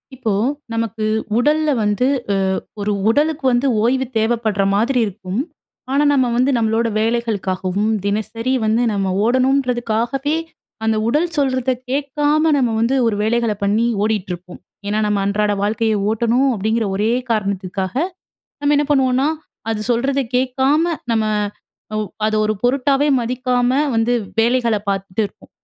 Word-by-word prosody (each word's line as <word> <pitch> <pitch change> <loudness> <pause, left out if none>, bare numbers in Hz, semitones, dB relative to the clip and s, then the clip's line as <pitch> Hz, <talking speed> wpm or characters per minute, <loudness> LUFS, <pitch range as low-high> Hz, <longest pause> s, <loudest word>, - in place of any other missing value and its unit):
இப்போ 225 -5 -1 0.4
நமக்கு 225 -1 -2 0.3
உடல்ல 300 +5 +2
வந்து 210 +4 +1 0.3
அ - - +1 0.5
ஒரு 205 +1 0 0.2
உடலுக்கு 295 +4 +1
வந்து 245 +3 +2 0.2
ஓய்வு 260 +3 +2
தேவைப்பட்ற 220 -2 +1
மாதிரி 240 +6 +2
இருக்கும். 195 0 -5 0.5
ஆனா 280 +2 +3
நம்ம 260 -3 +3
வந்து 255 +3 +2
நம்மளோட 225 0 +1
வேலைகளுக்காகவும், 210 -3 -1 0.2
தினசரி 225 +4 -1
வந்து 220 +2 +2
நம்ம 195 -2 0
ஓடணுன்றதுக்காகவே, 250 +1 +1 0.5
அந்த 220 0 +2
உடல் 300 +8 +2
சொல்றத 260 -2 +1 0.2
கேட்காம 295 +3 +1
நம்ம 250 -4 +1
வந்து 230 +4 +2
ஒரு 220 - 0
வேலைகள 230 +1 +1
பண்ணி 210 +3 +2 0.2
ஓடிட்டுருப்போம். 185 -4 -3 0.3
ஏன்னா, 210 +1 0
"நம்ம 210 -1 +1
அன்றாட 205 +1 +1
வாழ்க்கையை 220 +1 +1
ஓட்டணும்." 235 +5 +2
அப்படீங்கிற 220 +2 0
ஒரே 215 +3 +1 0.2
காரணத்துக்காக 195 -3 -2 0.7
நம்ம 290 0 +2
என்ன 295 - +2
பண்ணுவோம்ன்னா, 265 0 +3 0.4
அது 215 - -2
சொல்றத 270 +4 +1 0.2
கேட்காம, 265 +4 +2 0.3
நம்ம 220 -1 +1 0.7
ஒ - - 0 0.3
அத 215 - 0
ஒரு 215 - +1
பொருட்டாவே 275 +3 +2
மதிக்காம 250 +1 0 0.2
வந்து 225 +2 +2 0.3
வேலைகள 235 -1 +2
பார்த்துட்டு 195 +1 -1
இருப்போம். - - -20
230 Hz, 130 wpm, -19 LUFS, 215-260 Hz, 0.7 s, ஆனா